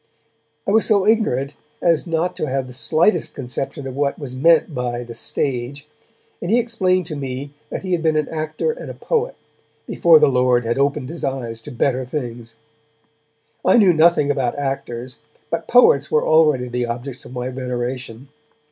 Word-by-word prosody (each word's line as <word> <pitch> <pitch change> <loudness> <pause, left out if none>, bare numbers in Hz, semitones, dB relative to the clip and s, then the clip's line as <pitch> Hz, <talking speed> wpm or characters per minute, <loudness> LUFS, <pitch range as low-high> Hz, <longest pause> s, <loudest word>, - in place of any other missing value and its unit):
I - - +2
was 220 +1 +4
so 200 -3 +3
ignorant 150 - +1 0.3
as 170 0 +1
not 165 +2 -1
to 155 - -2
have 135 -1 -1
the 125 - -11
slightest 165 - +1
conception 135 +1 -5
of 130 -1 -6
what 140 0 0
was 140 -4 -7
meant 160 +4 +3
by 120 -2 -3
the 120 -1 -9
stage, 130 +4 -3 0.6
and 175 - -4
he 230 - +4
explained 190 -7 +1
to 155 -2 -6
me 135 0 -5 0.2
that - - -5
he 185 - -4
had 175 -2 +1
been 160 -1 +2
an 155 -1 +1
actor 155 - -2
and - - -8
a - - -7
poet, 480 +1 -1 0.5
before 170 -2 +5
the - - +5
Lord 125 -2 +2
had 120 +3 -1
opened 140 -2 0
his 165 +1 -8
eyes 120 -4 -3
to 145 - -10
better 130 +1 0
things. 120 -4 -6 1.1
I 185 - +5
knew 195 -6 +6
nothing 160 -3 +4
about 135 -2 -1
actors, 130 -3 -4 0.3
but 165 0 -2
poets 155 - +5
were 150 - +2
already 150 -5 +4
the 125 0 -2
objects 120 +2 -6
of - - -11
my 125 0 -3
veneration. 125 0 -5
140 Hz, 180 wpm, -20 LUFS, 125-165 Hz, 1.1 s, knew